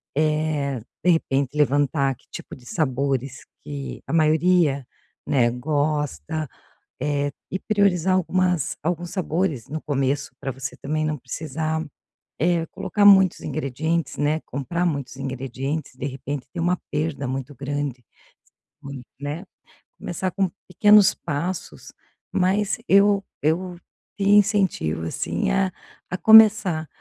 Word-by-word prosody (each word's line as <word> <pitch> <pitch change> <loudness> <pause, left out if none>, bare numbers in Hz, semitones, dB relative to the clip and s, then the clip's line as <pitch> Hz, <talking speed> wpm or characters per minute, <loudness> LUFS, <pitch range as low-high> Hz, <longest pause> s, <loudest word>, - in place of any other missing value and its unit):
Eh, 150 -3 0 0.2
de 180 - +3
repente 140 -3 0
levantar 140 -1 +2
que - - -30
tipo - - -8
de 125 -2 -17
sabores 135 -3 -1 0.2
que 140 -1 -6
a 135 - -5
maioria, 155 -3 +3 0.4
né, 130 -5 +3
gosta, 150 +3 -1 0.5
eh, 145 0 0 0.2
e 190 - -2
priorizar 190 -4 +2
algumas 180 -3 +1
alguns 175 +2 -2
sabores 165 - -1
no 155 +2 -3
começo 140 0 -1
para 135 - -3
você 130 +1 -6
também 155 +2 -2
não 155 -1 -1
precisar, 155 +4 -3 0.5
eh, 170 +1 +1
colocar 205 +5 -1
muitos 190 -3 +6
ingredientes, 155 +2 -2
né, 150 +2 +1
comprar 155 +7 -3
muitos 140 -6 -2
ingredientes 135 +2 -4
de 130 - -6
repente 135 0 -5
ter 170 - -4
uma 175 +1 +1
perda 150 -2 -2
muito 135 +2 -4
grande, 140 -2 -4 0.8
mui 140 -2 -7 0.2
né, 145 +6 -4 0.5
começar 185 +2 -3
com 190 -1 0 0.2
pequenos 205 +1 +6
passos, 165 +6 -4 0.4
mas 190 +2 +1
eu 200 0 +5 0.2
eu 175 +4 0 0.4
te 200 - -2
incentivo 200 - +3
assim 195 - -2
a 195 -1 +1 0.4
a 180 - -1
começar, 210 -8 +6
155 Hz, 125 wpm, -23 LUFS, 140-180 Hz, 0.8 s, muitos